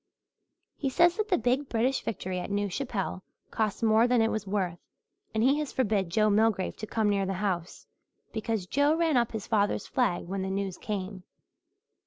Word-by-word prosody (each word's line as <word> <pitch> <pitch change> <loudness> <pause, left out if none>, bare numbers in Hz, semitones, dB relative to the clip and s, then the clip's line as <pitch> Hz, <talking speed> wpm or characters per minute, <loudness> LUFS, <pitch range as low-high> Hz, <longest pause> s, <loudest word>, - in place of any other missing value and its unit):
He 275 - -1
says 345 +6 +4
that 430 -1 -1
the 365 - +3
big 255 +4 0
British 245 +4 +1
victory 185 -3 -3
at 180 - -5
New 205 0 0
Chapelle 200 -4 -3 0.3
cost 215 0 -1
more 225 +1 +5
than 245 -1 +3
it 225 0 +3
was 215 -2 -3
worth 185 -4 -1 0.5
and 220 0 0
he 275 +4 +4
has 300 -2 -3
forbid 210 -7 0
Joe 215 +5 +3
Milgrave 210 -2 +2
to 215 - -6
come 220 -1 0
near 200 -2 +1
the 195 - -1
house 180 -3 -3 0.5
because 220 -3 -2
Joe 285 +8 +2
ran 325 -3 +2
up 235 -2 +2
his 220 -3 -5
father's 205 -2 +1
flag 225 -9 0
when 190 +2 -3
the 190 - -2
news 195 -1 -3
came. 195 -2 -4
215 Hz, 190 wpm, -28 LUFS, 195-245 Hz, 0.5 s, more